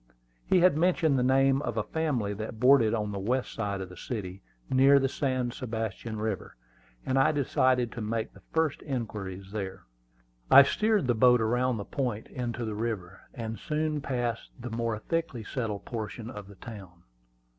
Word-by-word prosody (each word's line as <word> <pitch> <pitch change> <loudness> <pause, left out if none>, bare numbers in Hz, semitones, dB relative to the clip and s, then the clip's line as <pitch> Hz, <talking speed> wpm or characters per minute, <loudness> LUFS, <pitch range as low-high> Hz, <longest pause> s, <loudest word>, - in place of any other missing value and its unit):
He 185 - +4
had 180 -4 +5
mentioned 160 -4 +3
the - - +2
name 135 +1 +3
of 115 - -3
a 110 - +1
family 135 -11 -1
that 110 +1 -6
boarded 125 -3 +5
on 105 -2 -2
the 100 - -4
west 125 +6 -1
side 100 -3 -2
of 95 - -6
the 90 - -11
city, 95 -2 -5 0.3
near 135 +2 +6
the 135 -1 +3
San 130 -2 -1
Sebastian 110 -2 -4
River, 105 -3 -3 0.5
and 130 +1 +2
I 135 - +5
decided 130 -4 +2
to 120 - -6
make 110 +1 -2
the - - -16
first 160 -3 +1
inquiries 100 -8 -5
there. 95 -3 -5 0.7
I 140 - +10
steered 215 +4 +1
the 125 - +3
boat 125 +2 +5
around 120 +2 +1
the 100 - -5
point 120 -6 -2
into 120 -2 -3
the 110 - -3
river, 105 -4 -4
and 115 -2 -5
soon 155 -1 -1
passed 120 -4 -2
the 125 -1 -6
more 115 -1 -1
thickly 160 -1 -2
settled 110 -3 -4
portion 115 0 -5
of 105 -5 -9
the 100 - -13
town. 95 -5 -11
120 Hz, 175 wpm, -29 LUFS, 105-135 Hz, 0.7 s, I